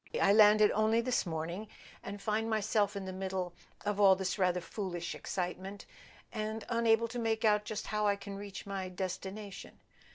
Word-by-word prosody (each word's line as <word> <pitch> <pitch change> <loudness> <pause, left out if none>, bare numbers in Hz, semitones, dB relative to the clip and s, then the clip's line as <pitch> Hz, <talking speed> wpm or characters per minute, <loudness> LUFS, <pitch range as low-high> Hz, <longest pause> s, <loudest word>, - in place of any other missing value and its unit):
I 200 - +5
landed 210 0 +7
only 215 +2 +3
this 245 -5 0
morning, 170 +6 -4 0.3
and 205 - -6
find 215 +2 -1
myself 215 -1 +1
in 200 -1 -4
the 185 - -5
middle 185 -1 -3 0.3
of 205 0 -1
all 195 -2 +7
this 190 +1 -2
rather 180 -1 +3
foolish 175 -1 -4
excitement, 190 +2 -4 0.5
and 220 0 -3
unable 230 -1 +3
to 245 +1 -4
make 225 -1 0
out 210 -1 +4
just 215 -1 -4
how 210 0 0
I 200 - +3
can 200 0 -8
reach 200 0 -7
my 195 -2 -4
destination. 190 +2 -6
205 Hz, 170 wpm, -33 LUFS, 190-215 Hz, 0.5 s, landed